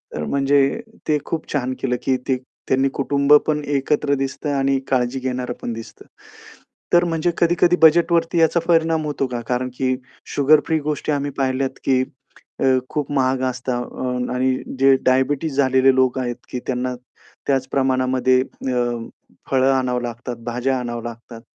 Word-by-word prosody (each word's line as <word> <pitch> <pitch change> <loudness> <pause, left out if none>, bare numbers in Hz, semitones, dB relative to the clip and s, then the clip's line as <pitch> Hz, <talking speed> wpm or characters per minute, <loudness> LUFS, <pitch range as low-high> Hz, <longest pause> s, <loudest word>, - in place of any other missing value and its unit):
तर 75 - -3
म्हणजे 140 - +2 0.3
ते 150 -1 +3
खूप 160 -2 -4
छान 130 -2 -1
केलं 125 -2 0
की 130 -1 +2
ते 130 -1 +2 0.3
त्यांनी 135 +1 +2
कुटुंब 140 +1 +2
पण 150 -1 +1 0.2
एकत्र 140 +1 0
दिसतंय 140 +2 -3
आणि 135 0 +1
काळजी 130 0 0
घेणारं 125 -1 -3
पण 120 - -3
दिसतं. 115 0 -10 0.9
तर 175 0 +6
म्हणजे 165 0 0
कधी-कधी 175 +1 +3
बजेटवरती 170 +1 +4
याचा 165 +1 +4
परिणाम 165 -2 +2
होतो 145 -2 -1
का? 120 -2 -4
कारण 125 +1 -1
की 130 -1 +1 0.4
शुगर 145 +2 +5
फ्री 160 -1 +1
गोष्टी 150 +1 -2
आम्ही 145 -1 -1
पाहिल्यात 135 0 -1
की 130 -1 +2 0.6
अ, - - +1 0.2
खूप 150 -2 -3
महाग 130 -2 +1
असतात 125 0 -3
आणि 130 +1 +1
अ, - - -8
जे 135 0 +6
डायबिटीज 135 +3 +1
झालेले 130 -1 +4
लोक 130 0 +2
आहेत 120 -1 -2
की 125 - -4
त्यांना 125 0 -2 0.5
त्याच 135 -2 +1
प्रमाणामध्ये 130 -1 +2
अ, 120 -3 -3 0.4
फळं 135 0 +4
आणावं 125 -2 0
लागतात, 120 +1 -5
भाज्या 125 +2 -1
आणाव्या 120 -1 -5
लागतात. 115 0 -12
130 Hz, 155 wpm, -21 LUFS, 125-145 Hz, 0.9 s, तर